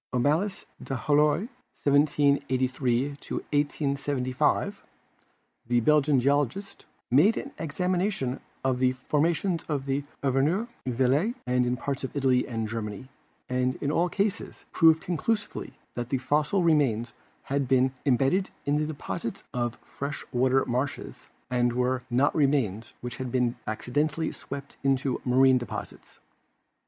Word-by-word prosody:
Omalius 155 +11 +1 0.2
d'Halloy 150 +4 +2 0.4
(1783 140 -3 +2
1875), 140 -2 -1 0.9
the 120 0 +3
Belgian 150 0 +4
geologist, 145 - -1 0.2
made 165 - +5
an 275 - -5
examination 180 -3 -1 0.2
of 130 -1 +1
the 130 0 +3
formations 165 +7 0
in 140 -1 -1 0.2
Auvergne, 140 - +2 0.2
Velay 135 - +2
and 125 0 +2
in 125 +1 0
parts 140 +1 -3
of 130 - -5
Italy 130 -3 +2
and 115 -2 -2
Germany, 110 +2 -5 0.4
and 125 0 0
in 145 - -2
all 175 +3 +2
cases 200 +2 -2
proved 160 -2 +5
conclusively 210 +5 -2 0.2
that 120 0 -4
the 135 - +1
fossil 150 +8 +1
remains 130 -8 +2 0.3
had 140 -1 -1
been 130 0 +3
im 130 -4 +3
bedded 180 +10 +1 0.2
in 145 +1 +2
the 155 - 0
deposits 155 -3 -5
of 120 -1 -1
fresh 140 +1 -6
water 130 +1 +2
marshes 125 +3 -3 0.2
and 120 -1 +2
were 125 +1 0
not 130 +4 +3
remains 130 - +1
which 120 -2 -6
had 130 -2 -4
been 125 -1 +1
accidentally 150 +8 -1
swept 140 0 -8
into 135 -1 +1
ma 125 0 +1
rine 130 -1 +6
deposits. 120 -4 -8
135 Hz, 125 wpm, -27 LUFS, 125-150 Hz, 0.9 s, rine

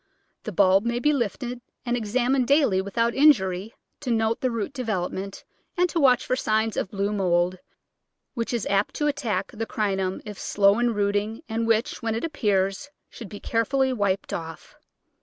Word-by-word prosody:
The 215 - -3
bulb 195 +1 +4
may 235 0 -1
be 295 +5 +2
lifted 245 0 -3 0.2
and 240 0 0
examined 245 +3 +1
daily 275 -10 +3
without 230 +4 0
injury, 215 -8 +3 0.2
to 275 - -5
note 225 -1 +1
the 255 - +1
root 230 +3 -3
development 195 -5 -3 0.3
and 360 +1 +4
to 335 - -1
watch 255 -4 +4
for 255 - +1
signs 220 -3 0
of - - -2
blue 200 +1 -1
mould, 180 -2 +1 0.7
which 235 -4 -3
is 235 -4 -1
apt 200 +1 0
to 295 - -1
attack 285 -7 -1
the 225 0 -4
Crinum 195 -3 -1
if 210 -2 -8
slow 200 +2 +3
in 240 -2 +1
rooting 205 +5 -1
and 225 0 -2
which, 225 +3 +1
when 225 -2 -1
it 225 - -3
appears, 205 -4 0 0.2
should 225 -5 -9
be 205 - -8
care 230 0 0
fully 265 +2 +1
wiped 200 -4 -1
off. 165 -1 -7
225 Hz, 175 wpm, -25 LUFS, 200-245 Hz, 0.7 s, bulb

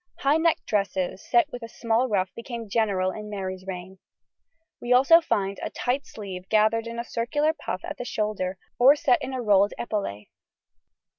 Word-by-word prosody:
High 280 +3 +3
necked 325 0 +1
dresses 195 -2 -1
set 340 -5 +3
with 245 - -7
a 230 - -7
small 230 +2 0
ruff 190 -3 0
became 230 -1 -6
general 200 -4 +1
in 210 +2 -8
Mary's 190 -2 -5
reign. 185 0 -7 0.8
We 240 +1 +1
also 275 +7 +7
find 200 -10 -1
a - - -3
tight 255 +3 -2
sleeve 190 -3 -8
gathered 220 +1 +3
in 230 0 -6
a 235 - -2
circular 290 +7 0
puff 290 - -5
at - - -6
the - - -3
shoulder 210 -5 -2 0.2
or 265 +4 +8
set 260 -4 +2
in - - -4
a 255 -2 -3
rolled 205 -1 +3
epaulet. 200 - -3
220 Hz, 175 wpm, -25 LUFS, 195-250 Hz, 0.8 s, or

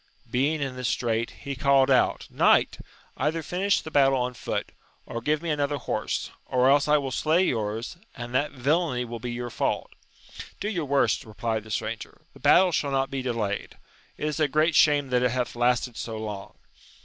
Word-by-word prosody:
Being 145 +5 +1
in 135 -2 -4
this 125 -1 -3
strait, 115 -2 0
he 140 0 -4
called 135 0 +3
out. - - +2
Knight! - - +3 0.4
either 155 +4 -1
finish 195 +4 +1
the 160 - -8
battle 135 -2 +4
on 125 0 -1
foot, - - -4 0.3
or 115 - -5
give 150 +5 0
me 165 - -1
another 145 -1 0
horse, - - -3 0.2
or 130 +1 +3
else 145 +1 +3
I 150 0 +5
will 135 -2 -3
slay 160 +7 +2
yours, 110 - -2 0.2
and 120 0 -7
that 145 +4 +1
villainy 140 -1 0
will 120 0 -6
be 120 +1 -4
your 120 0 -5
fault. - - -1 0.7
Do 210 - -2
your 175 -8 -2
worst! 135 -5 +2
replied 110 0 -3
the - - -12
stranger: 110 +1 -4
the - - -16
battle 185 0 +5
shall 145 -3 0
not 135 0 0
be 135 -1 -2
delayed; 115 -5 -3 0.4
it - - -3
is 150 -1 -2
a 155 - +3
great 155 +3 +2
shame 145 -2 +4
that 125 -1 +2
it 125 - +3
hath 125 0 -2
lasted 120 0 +1
so 115 -1 -5
long. 105 -3 -6
130 Hz, 195 wpm, -26 LUFS, 120-150 Hz, 0.7 s, I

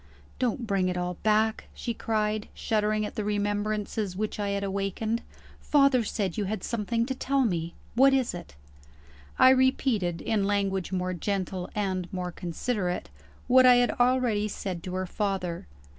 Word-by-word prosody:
"Don't 245 -1 0
bring 195 -3 +1
it 180 - -2
all 180 0 -2
back!" 220 +1 +2
she 235 - -3
cried, 215 -1 -1
shuddering 215 -1 0
at - - -6
the 215 - -3
remembrances 205 -1 -1
which 215 +2 -3
I 205 -1 -1
had 200 0 -1
awakened, 200 +3 -2 0.4
"Father 275 -4 +4
said 200 -4 -2
you 205 - 0
had 215 +3 -3
something 230 +1 -1
to 265 - -2
tell 270 +1 +1
me. 170 -5 -2 0.2
What 270 +3 +6
is 265 -2 +1
it?" 175 - -9 0.8
I 260 - +8
repeated 255 -9 +2
(in 210 -3 0
language 195 -2 0
more 185 -1 -1
gentle 185 0 -3
and 185 -4 -2
more 180 -1 -3
considerate) 180 - -3 0.3
what 255 0 +6
I 250 - +8
had 245 0 +3
already 245 -4 +2
said 190 -4 -5
to 185 0 -4
her 185 0 -1
father. 185 - -3
205 Hz, 160 wpm, -27 LUFS, 185-230 Hz, 0.8 s, I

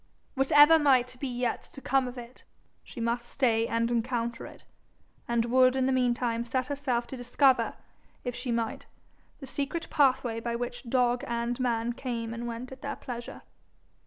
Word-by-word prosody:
Whatever 290 +4 +6
might 255 -4 +3
be 275 - -3
yet 245 -1 -2
to - - -13
come 270 -1 +1
of 250 +1 -8
it, 240 +1 -10 0.4
she 250 - -10
must 235 +1 -1
stay 230 -4 +2
and 230 +1 0
encounter 235 0 -2
it, - - -14 0.6
and 235 -1 +1
would 255 +1 +4
in 260 -1 +1
the 265 - +2
meantime 240 -2 +1
set 255 +2 -1
herself 260 -3 -1
to - - -8
discover, 255 +2 +2 0.5
if 245 - -3
she 250 +1 -4
might, 230 -1 -2 0.5
the - - -6
secret 285 +5 -3
pathway 255 -5 +2
by 235 0 -3
which 245 +1 -5
dog 245 -1 +2
and 235 +1 -2
man 240 -1 0
came 235 -2 -4
and 235 +1 -5
went 235 +2 -6
at 265 +1 -10
their 280 -1 -4
pleasure. 240 -1 -8
245 Hz, 170 wpm, -28 LUFS, 235-260 Hz, 0.6 s, Whatever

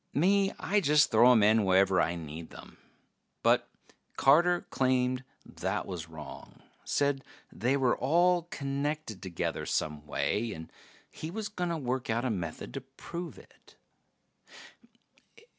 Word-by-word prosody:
Me, 195 +5 +3
I 210 - +2
just 150 -3 +4
throw 120 +3 +7
'em 115 -4 +5
in 110 +1 +5
wherever 95 0 +4
I 85 - 0
need 80 0 -8
'em. - - -13 0.6
But - - +3 0.5
Carter 175 +6 +5
claimed 130 -1 +1 0.2
that - - -3
was 85 -3 -6
wrong. 75 -3 -11 0.2
Said 140 -1 0 0.3
they 130 +4 0
were 130 -3 +2
all 175 +6 +3
connected 140 - -3
together 90 -3 -3
some 75 -1 -2
way, 110 0 -1
and 80 -2 -9 0.4
he 155 - -7
was 210 +3 -4
gonna 175 -4 -2
work 130 -3 -3
out 115 +3 0
a 125 - +1
method 85 -6 -5
to 135 - -4
prove 170 +6 -8
it. - - -19
130 Hz, 135 wpm, -30 LUFS, 95-155 Hz, 0.6 s, throw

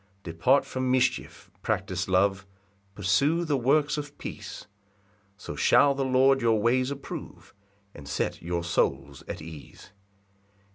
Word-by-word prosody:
2 85 - -6
Depart 85 +12 +3
from 130 0 -3
mischief, 125 -1 0
practise 95 0 -2
love, 95 +1 +1 0.5
Pursue 140 - +2
the 150 -3 +1
works 145 +4 +2
of 145 0 -8
peace; - - -8 0.7
So - - -7
shall 140 - +4
the 135 0 -2
Lord 135 +1 +3
your 115 -2 +3
ways 125 +4 +2
approve, 140 -1 -8 0.4
And 70 -2 -12
set 70 - -2
your 85 0 -3
souls 70 -4 -1
at - - -6
ease. 80 -3 -12
125 Hz, 135 wpm, -27 LUFS, 90-135 Hz, 0.7 s, shall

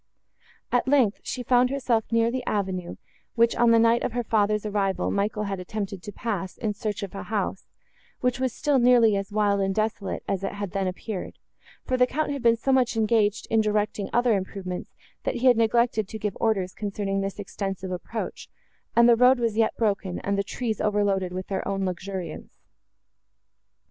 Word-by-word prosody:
At 245 +1 +1
length, 260 -7 +3
she 250 - -4
found 250 +1 +4
herself 245 -5 0
near 230 0 +3
the 255 0 -3
avenue, 185 -4 -2 0.4
which, 235 0 +3
on 240 0 +4
the 230 - +6
night 230 +1 +4
of - - -2
her 245 0 -1
father's 210 -1 +1
arrival, 200 -2 0
Michael 210 +1 -1
had 195 -2 -3
attempted 195 0 -5
to 205 - -7
pass 195 -4 -4
in 215 -3 -2
search 210 0 -4
of 195 - -6
a 195 - -5
house, 205 -3 -3 0.5
which 250 +1 0
was 260 -1 0
still 285 +3 +1
nearly 240 -3 +5
as 195 0 -3
wild 205 -1 +2
and 195 0 0
desolate 215 -2 -2
as 195 -1 -1
it 195 - -2
had 205 -2 -5
then 195 -1 -1
appeared; 185 +2 -5 0.5
for 255 - 0
the 250 0 +4
Count 305 +3 -1
had 280 -2 -3
been 230 -1 +5
so 270 +4 0
much 255 -3 +2
engaged 215 -1 +2
in 225 -1 +4
directing 210 -1 -1
other 240 -2 +3
improvements, 185 -1 -5 0.3
that - - -1
he 250 - -2
had 250 -1 +7
neglected 225 -1 +2
to 220 - -6
give 210 -2 -3
orders, 195 -5 0
concerning 200 -1 -2
this 195 0 -4
extensive 195 -2 -5
approach, 185 +5 -5 0.5
and 235 0 +6
the 240 - +7
road 250 +2 +5
was 230 -3 0
yet 225 0 +1
broken, 200 -5 0
and 200 - -1
the 200 - 0
trees 220 +1 -3
overloaded 200 -3 +1
with 185 +1 -4
their 190 -1 -3
own 195 -1 -1
luxuriance. 185 0 -5
210 Hz, 190 wpm, -25 LUFS, 195-235 Hz, 0.5 s, had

